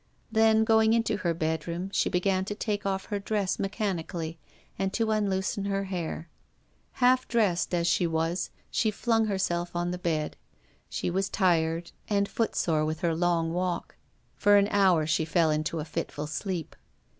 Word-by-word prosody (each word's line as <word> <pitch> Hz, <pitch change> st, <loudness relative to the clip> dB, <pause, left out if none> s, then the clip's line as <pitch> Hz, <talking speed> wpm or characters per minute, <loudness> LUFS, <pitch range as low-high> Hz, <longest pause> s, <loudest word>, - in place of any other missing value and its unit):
Then, 220 Hz, 0 st, +4 dB
going 220 Hz, 0 st, +4 dB
into 230 Hz, 0 st, +1 dB
her 175 Hz, -4 st, 0 dB
bedroom, 170 Hz, +3 st, -2 dB
she -, -, +2 dB
began 185 Hz, +1 st, +1 dB
to 205 Hz, -, -4 dB
take 205 Hz, -2 st, -2 dB
off 190 Hz, -1 st, -1 dB
her 205 Hz, -, 0 dB
dress 200 Hz, -2 st, -1 dB
mechanically 175 Hz, -5 st, -3 dB, 0.4 s
and 195 Hz, 0 st, 0 dB
to 225 Hz, -2 st, +1 dB
unloosen 200 Hz, -1 st, 0 dB
her 195 Hz, 0 st, 0 dB
hair. 175 Hz, -3 st, -4 dB, 0.7 s
Half 255 Hz, 0 st, +3 dB
dressed 210 Hz, -7 st, +1 dB
as 170 Hz, -1 st, +1 dB
she 170 Hz, 0 st, +2 dB
was, 165 Hz, +2 st, -1 dB, 0.2 s
she 220 Hz, -, +2 dB
flung 225 Hz, +1 st, +1 dB
herself 175 Hz, -4 st, -1 dB
on 175 Hz, 0 st, 0 dB
the 180 Hz, -, -4 dB
bed. 160 Hz, -4 st, -1 dB, 0.5 s
She -, -, -2 dB
was 195 Hz, +2 st, 0 dB
tired 170 Hz, -4 st, +1 dB, 0.2 s
and 200 Hz, -1 st, +1 dB
foot 225 Hz, +2 st, -1 dB
sore 155 Hz, -3 st, +1 dB
with 155 Hz, +2 st, -2 dB
her 170 Hz, -2 st, +1 dB
long 165 Hz, -1 st, +1 dB
walk 180 Hz, 0 st, -2 dB, 0.4 s
For 205 Hz, 0 st, +5 dB
an 200 Hz, 0 st, +3 dB
hour 185 Hz, -6 st, +4 dB
she 160 Hz, +1 st, +1 dB
fell 165 Hz, 0 st, +2 dB
into 155 Hz, +2 st, -1 dB
a 150 Hz, -, -3 dB
fitful 150 Hz, -1 st, -4 dB
sleep. 165 Hz, +2 st, -4 dB
185 Hz, 165 wpm, -28 LUFS, 165-205 Hz, 0.7 s, For